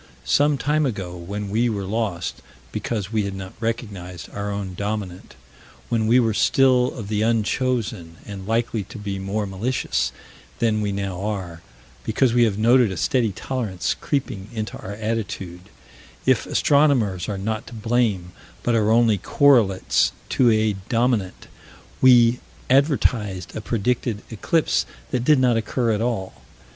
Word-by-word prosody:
Some 145 Hz, 0 st, +3 dB
time 150 Hz, +3 st, +1 dB
ago, 95 Hz, -7 st, -4 dB
when 100 Hz, +4 st, -5 dB
we 115 Hz, +3 st, +2 dB
were 100 Hz, -3 st, -2 dB
lost, 100 Hz, -3 st, -3 dB, 0.3 s
because 105 Hz, -4 st, -3 dB
we 110 Hz, -, +2 dB
had 100 Hz, -1 st, -4 dB
not 95 Hz, -1 st, -7 dB
recognized 100 Hz, -7 st, -5 dB
our 100 Hz, 0 st, -4 dB
own 100 Hz, -2 st, -4 dB
dominant, 100 Hz, -2 st, -5 dB, 0.5 s
when 110 Hz, -2 st, +1 dB
we 120 Hz, +3 st, +5 dB
were 115 Hz, -3 st, +2 dB
still 130 Hz, +2 st, +3 dB
of 110 Hz, -4 st, -6 dB
the 105 Hz, 0 st, -1 dB
unchosen 115 Hz, -5 st, 0 dB
and 100 Hz, -2 st, -8 dB
likely 115 Hz, -1 st, 0 dB
to 120 Hz, -, -10 dB
be 100 Hz, -2 st, -4 dB
more 100 Hz, +2 st, -2 dB
malicious 95 Hz, -, -1 dB, 0.5 s
than 110 Hz, -2 st, +1 dB
we 105 Hz, -1 st, -1 dB
now 100 Hz, -2 st, -3 dB
are 95 Hz, -6 st, -4 dB, 0.4 s
because 115 Hz, +2 st, +1 dB
we 120 Hz, -1 st, +5 dB
have 105 Hz, -3 st, -1 dB
noted 120 Hz, 0 st, +4 dB
a 95 Hz, -, -5 dB
steady 115 Hz, +5 st, +1 dB
tolerance 100 Hz, -, -2 dB
creeping 120 Hz, -8 st, -3 dB
into 110 Hz, -2 st, -4 dB
our 100 Hz, -, -7 dB
attitude 100 Hz, -5 st, -4 dB, 0.6 s
if -, -, +2 dB
astronomers 125 Hz, -, +2 dB
are 100 Hz, -, -2 dB
not 110 Hz, +3 st, -3 dB
to -, -, -10 dB
blame, 110 Hz, -5 st, 0 dB, 0.3 s
but 120 Hz, -, +1 dB
are 110 Hz, -2 st, +2 dB
only 115 Hz, -2 st, +4 dB
correlates 110 Hz, -5 st, +3 dB, 0.2 s
to 125 Hz, -2 st, +4 dB
a 110 Hz, -1 st, +2 dB, 0.2 s
dominant 115 Hz, -5 st, 0 dB, 0.6 s
we 120 Hz, -2 st, +6 dB, 0.3 s
advertised 120 Hz, -, +1 dB
a -, -, -4 dB
predicted 115 Hz, 0 st, -1 dB
eclipse 155 Hz, +9 st, +1 dB, 0.2 s
that 125 Hz, -2 st, 0 dB
did 150 Hz, +3 st, +5 dB
not 125 Hz, -3 st, +3 dB
occur 115 Hz, +1 st, 0 dB
at 105 Hz, 0 st, 0 dB
all. 115 Hz, -6 st, -3 dB
110 Hz, 150 wpm, -23 LUFS, 100-120 Hz, 0.6 s, we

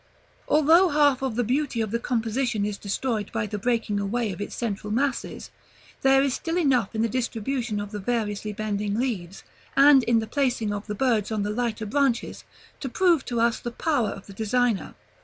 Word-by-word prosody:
Although 320 Hz, +5 st, +5 dB
half 290 Hz, -3 st, +3 dB
of 265 Hz, -4 st, -2 dB
the 245 Hz, -, +1 dB
beauty 255 Hz, +1 st, -1 dB
of 220 Hz, -2 st, -1 dB
the 235 Hz, -, 0 dB
composition 235 Hz, -2 st, -1 dB
is 205 Hz, -1 st, -4 dB
destroyed 215 Hz, +1 st, -2 dB
by 225 Hz, -1 st, -1 dB
the 210 Hz, 0 st, -4 dB
breaking 225 Hz, -2 st, 0 dB
away 215 Hz, +2 st, -1 dB
of 185 Hz, -, -7 dB
its 205 Hz, -, -5 dB
central 210 Hz, -3 st, -3 dB
masses, 265 Hz, +3 st, -2 dB, 0.5 s
there 270 Hz, 0 st, +5 dB
is 275 Hz, -2 st, +1 dB
still 330 Hz, +5 st, -2 dB
enough 260 Hz, -, +1 dB
in 220 Hz, -, +1 dB
the -, -, +2 dB
distribution 240 Hz, -1 st, -2 dB
of 205 Hz, 0 st, -5 dB
the 210 Hz, -, -5 dB
variously 210 Hz, -1 st, -2 dB
bending 205 Hz, -1 st, -2 dB
leaves, 205 Hz, -7 st, -3 dB, 0.3 s
and 280 Hz, -1 st, +8 dB
in 235 Hz, -1 st, +3 dB
the 225 Hz, -, 0 dB
placing 245 Hz, -5 st, 0 dB
of 205 Hz, +1 st, -5 dB
the 210 Hz, -, -3 dB
birds 225 Hz, -3 st, +1 dB
on 215 Hz, -2 st, -1 dB
the 205 Hz, -, -2 dB
lighter 225 Hz, -1 st, -2 dB
branches, 260 Hz, +1 st, 0 dB, 0.4 s
to 270 Hz, -, -4 dB
prove 345 Hz, 0 st, +3 dB
to 240 Hz, -2 st, -2 dB
us 235 Hz, 0 st, +2 dB
the 240 Hz, -, -4 dB
power 245 Hz, -2 st, 0 dB
of 195 Hz, -, -8 dB
the 200 Hz, -, -11 dB
designer. 225 Hz, +1 st, 0 dB
230 Hz, 195 wpm, -25 LUFS, 210-265 Hz, 0.5 s, and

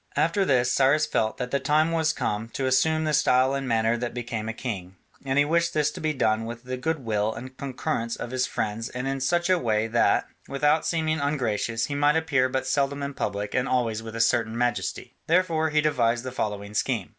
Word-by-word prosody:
After 170 Hz, +5 st, +2 dB
this 125 Hz, -5 st, +2 dB
Cyrus 140 Hz, +3 st, +3 dB
felt 110 Hz, -7 st, -1 dB
that 125 Hz, -1 st, -4 dB
the 140 Hz, -, +1 dB
time 155 Hz, +3 st, +2 dB
was 160 Hz, -2 st, +2 dB
come 105 Hz, +2 st, -3 dB
to 135 Hz, -, -2 dB
assume 155 Hz, +5 st, +2 dB
the 155 Hz, -1 st, 0 dB
style 130 Hz, -1 st, +3 dB
and 135 Hz, -1 st, -2 dB
manner 115 Hz, 0 st, +2 dB
that 120 Hz, 0 st, -4 dB
became 115 Hz, -2 st, -4 dB
a -, -, 0 dB
king: 95 Hz, -6 st, -6 dB, 0.3 s
and 135 Hz, 0 st, -1 dB
he 145 Hz, -, +5 dB
wished 170 Hz, +2 st, +1 dB
this 150 Hz, -1 st, +2 dB
to -, -, -9 dB
be 155 Hz, 0 st, +1 dB
done 110 Hz, -5 st, +1 dB
with 120 Hz, +1 st, -7 dB
the 130 Hz, 0 st, -4 dB
goodwill 115 Hz, -7 st, -1 dB
and 130 Hz, +3 st, -9 dB
concurrence 125 Hz, -3 st, -3 dB
of 120 Hz, -, -6 dB
his 130 Hz, 0 st, 0 dB
friends 110 Hz, +1 st, -3 dB
and 125 Hz, +2 st, -4 dB
in 135 Hz, 0 st, -2 dB
such 175 Hz, +6 st, +1 dB
a 185 Hz, -1 st, +3 dB
way 110 Hz, -4 st, +1 dB
that, 115 Hz, +1 st, +2 dB, 0.2 s
without 150 Hz, +3 st, +1 dB
seeming 160 Hz, -1 st, 0 dB
ungracious, 120 Hz, -5 st, -1 dB
he 145 Hz, -, -5 dB
might 145 Hz, +1 st, +3 dB
appear 145 Hz, -6 st, +2 dB
but 130 Hz, 0 st, -2 dB
seldom 140 Hz, +1 st, 0 dB
in 140 Hz, 0 st, -4 dB
public 105 Hz, -4 st, -3 dB
and 125 Hz, -, 0 dB
always 115 Hz, -3 st, 0 dB
with 115 Hz, 0 st, -8 dB
a -, -, -4 dB
certain 115 Hz, 0 st, +1 dB
majesty. 120 Hz, 0 st, -2 dB
Therefore 165 Hz, -2 st, +2 dB
he 150 Hz, 0 st, +2 dB
devised 120 Hz, -5 st, +1 dB
the 130 Hz, -, -5 dB
following 105 Hz, -4 st, -4 dB
scheme. -, -, -1 dB
130 Hz, 215 wpm, -25 LUFS, 115-150 Hz, 0.3 s, he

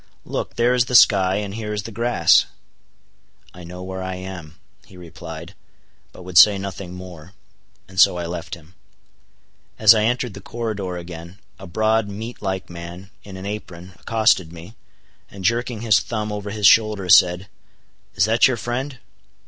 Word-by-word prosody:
Look, -, -, -5 dB
there 120 Hz, +1 st, +2 dB
is 125 Hz, -1 st, +2 dB
the 125 Hz, -, -2 dB
sky, 95 Hz, -5 st, +5 dB
and 100 Hz, -1 st, -4 dB
here 105 Hz, -1 st, -5 dB
is 105 Hz, -1 st, -3 dB
the 115 Hz, -, -8 dB
grass." 120 Hz, +3 st, +3 dB, 1.1 s
"I 90 Hz, -, -12 dB
know 90 Hz, +2 st, -9 dB
where 95 Hz, 0 st, -6 dB
I 95 Hz, 0 st, -4 dB
am," 90 Hz, -4 st, -9 dB, 0.3 s
he 95 Hz, -, -16 dB
replied, 85 Hz, 0 st, -10 dB, 0.6 s
but 90 Hz, -, -13 dB
would 90 Hz, -1 st, +3 dB
say 105 Hz, -1 st, +7 dB
nothing 95 Hz, -2 st, -7 dB
more, 90 Hz, -1 st, -11 dB, 0.5 s
and 95 Hz, 0 st, -7 dB
so 90 Hz, -, +6 dB
I 85 Hz, -, -4 dB
left 85 Hz, 0 st, -6 dB
him. 85 Hz, 0 st, -19 dB, 1.0 s
As 110 Hz, 0 st, +7 dB
I 110 Hz, -1 st, +1 dB
entered 125 Hz, -1 st, -1 dB
the -, -, -10 dB
corridor 105 Hz, -6 st, -5 dB
again, 85 Hz, +1 st, -10 dB, 0.2 s
a 95 Hz, -, -10 dB
broad 110 Hz, +3 st, +1 dB
meat 110 Hz, +4 st, -8 dB
like 95 Hz, -2 st, -3 dB
man, 85 Hz, +3 st, -10 dB
in 95 Hz, -2 st, -10 dB
an 95 Hz, -, -8 dB
apron, 95 Hz, -3 st, -7 dB
accosted 110 Hz, -7 st, +1 dB
me, 85 Hz, +4 st, -12 dB, 0.6 s
and 95 Hz, -2 st, -9 dB
jerking 120 Hz, -1 st, -1 dB
his 110 Hz, -3 st, +4 dB
thumb 110 Hz, -2 st, -4 dB
over 105 Hz, 0 st, -5 dB
his 105 Hz, 0 st, -2 dB
shoulder 105 Hz, -2 st, +4 dB
said—"Is 90 Hz, +1 st, +1 dB
that 115 Hz, +2 st, +4 dB
your 130 Hz, -2 st, -1 dB
friend?" 125 Hz, +4 st, -4 dB
95 Hz, 165 wpm, -21 LUFS, 90-110 Hz, 1.1 s, say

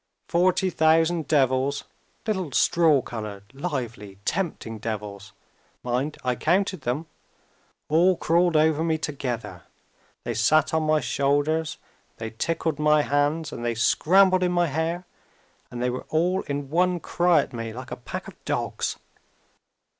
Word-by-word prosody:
Forty 185 Hz, +2 st, +2 dB
thousand 160 Hz, +1 st, +3 dB
devils 135 Hz, -1 st, +2 dB, 0.4 s
little 190 Hz, -8 st, -2 dB
straw 160 Hz, -5 st, +4 dB
colored, 105 Hz, -4 st, -6 dB
lively, 120 Hz, -, -5 dB
tempting 150 Hz, -, -2 dB
devils 105 Hz, -2 st, -5 dB, 0.5 s
(mind, 125 Hz, +5 st, -1 dB
I 125 Hz, -1 st, 0 dB
counted 185 Hz, -, +1 dB
them!) 130 Hz, +7 st, -2 dB, 0.8 s
all 175 Hz, +4 st, +4 dB
crawled 170 Hz, 0 st, +2 dB
over 155 Hz, 0 st, +3 dB
me 160 Hz, -1 st, +1 dB
together. 120 Hz, -, -4 dB, 0.6 s
They 120 Hz, -, -3 dB
sat 135 Hz, +10 st, +3 dB
on 160 Hz, -, +2 dB
my 155 Hz, 0 st, +3 dB
shoulders 145 Hz, +3 st, 0 dB
and -, -, -36 dB
they 110 Hz, -1 st, -5 dB
tickled 160 Hz, +2 st, -1 dB
my 150 Hz, 0 st, +4 dB
hands 145 Hz, +2 st, 0 dB
and 120 Hz, -, -6 dB
they 120 Hz, -1 st, -1 dB
scrambled 185 Hz, -, +4 dB
in 180 Hz, -1 st, +2 dB
my 175 Hz, 0 st, +3 dB
hair 165 Hz, +4 st, -2 dB, 0.6 s
and 120 Hz, 0 st, -5 dB
they 125 Hz, -, +1 dB
were 125 Hz, -, -6 dB
all 180 Hz, +4 st, +1 dB
in 140 Hz, -1 st, -4 dB
one 180 Hz, +1 st, +2 dB
cry 170 Hz, -1 st, +3 dB
at -, -, -8 dB
me 115 Hz, -1 st, -4 dB
like 130 Hz, +3 st, -9 dB
a -, -, -3 dB
pack 120 Hz, -, -7 dB
of -, -, -13 dB
dogs. -, -, -2 dB
150 Hz, 145 wpm, -25 LUFS, 125-170 Hz, 0.8 s, straw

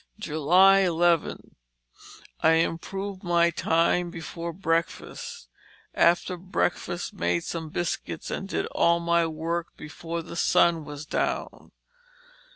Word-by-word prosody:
" 215 Hz, -, -9 dB
11. 175 Hz, +1 st, +3 dB, 0.9 s
I 160 Hz, -, +5 dB
improved 190 Hz, +4 st, -2 dB
my 170 Hz, -1 st, +3 dB
time 170 Hz, +2 st, +1 dB
before 170 Hz, 0 st, -6 dB
breakfast; 170 Hz, -, -3 dB, 0.5 s
after 175 Hz, +1 st, +2 dB
breakfast 175 Hz, -1 st, -2 dB
made 85 Hz, 0 st, -1 dB
some 160 Hz, -2 st, -5 dB
biscuits 165 Hz, 0 st, -4 dB
and 195 Hz, -, -4 dB
did -, -, -1 dB
all 170 Hz, 0 st, +3 dB
my 170 Hz, 0 st, +2 dB
work 165 Hz, +2 st, -4 dB
before 165 Hz, +2 st, -6 dB
the -, -, -9 dB
sun 170 Hz, -2 st, +3 dB
was 145 Hz, 0 st, -8 dB
down. -, -, -3 dB
170 Hz, 110 wpm, -26 LUFS, 165-175 Hz, 0.9 s, I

